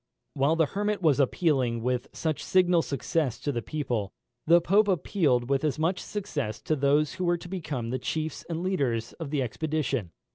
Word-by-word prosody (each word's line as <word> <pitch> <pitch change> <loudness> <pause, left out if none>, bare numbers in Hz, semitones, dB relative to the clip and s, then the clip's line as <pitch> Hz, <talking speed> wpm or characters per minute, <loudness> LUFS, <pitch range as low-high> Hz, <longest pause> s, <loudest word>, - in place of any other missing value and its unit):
While 140 +4 +2
the 165 -1 +3
Hermit 205 +3 -2
was 150 -4 +4
appealing 130 -5 +1
with 125 0 -1
such 155 -2 -2
signal 180 -2 +4
success 140 -3 -1
to 145 - -1
the 120 -3 -2
people, 120 -8 -3 0.4
the 170 +2 +7
Pope 200 +5 +3
appealed 155 -9 +1
with 135 +1 +1
as 150 -1 0
much 165 +4 0
success 150 - -4
to 155 - +1
those 145 +2 +2
who 185 - -4
were 175 0 +2
to 170 - -10
become 155 -10 -4
the 130 - -1
chiefs 155 -1 -3
and 165 +1 -3
leaders 130 -12 -1
of 160 -4 -5
the 145 -2 0
expedition. 140 - -2
155 Hz, 185 wpm, -27 LUFS, 130-170 Hz, 0.4 s, the